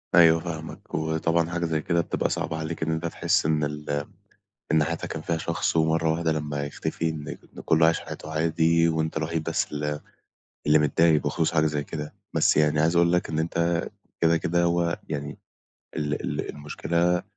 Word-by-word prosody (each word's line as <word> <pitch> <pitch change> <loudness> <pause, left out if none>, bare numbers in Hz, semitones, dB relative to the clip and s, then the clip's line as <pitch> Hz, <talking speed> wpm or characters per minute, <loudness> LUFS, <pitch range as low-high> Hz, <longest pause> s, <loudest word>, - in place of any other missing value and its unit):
أيوه 80 -1 +7
فاهمك، 80 -1 -7
وطبعًا 80 +1 +1
حاجة 85 -1 -1
زَيّ 80 -2 0
كده 85 +1 +1
بتبقى - - -1
صعبة 80 - -2
عليك 80 +1 -4
إن 80 - 0
أنت 80 +1 -2
تحسّ 80 - +1
إن 75 -1 +2
ال 75 0 -2 0.7
إن 80 -1 +4
حياتك 85 +1 -3
كان 80 - -4
فيها 85 +1 -1
شخص 85 +1 -1
ومَرّة 80 0 +2
واحدة 80 0 0
لمّا 75 -2 -2
يختفي 80 +3 -2
إن 75 -2 -5
ك - - -22 0.2
إن - - -7
كُلّه 80 0 +4
عايش 80 - +3
حياته 80 - -8
عادي، 80 +1 +3
وأنت 80 -1 -1
الوحيد 80 0 -2
بس 80 +1 -1
ال 75 0 -2 0.7
اللي 75 +1 +6
متضايق 75 +1 +3
بخصوص 80 +3 0
حاجة 80 -1 +3
زَيّ 75 -1 0
كده، 75 0 -6 0.2
بس - - +3
يعني 75 0 +3
عايز 80 +2 +3
أقول 85 0 +4
لك 90 - +1
إن 80 - -1
أنت 85 +1 0 0.3
كده، 85 0 +4
كده 85 +1 +1
هو 85 0 +1
يعني 75 -1 -4 0.6
ال 75 -1 0
ال - - -3
المشكلة 85 +4 0
80 Hz, 185 wpm, -26 LUFS, 75-85 Hz, 0.7 s, أيوه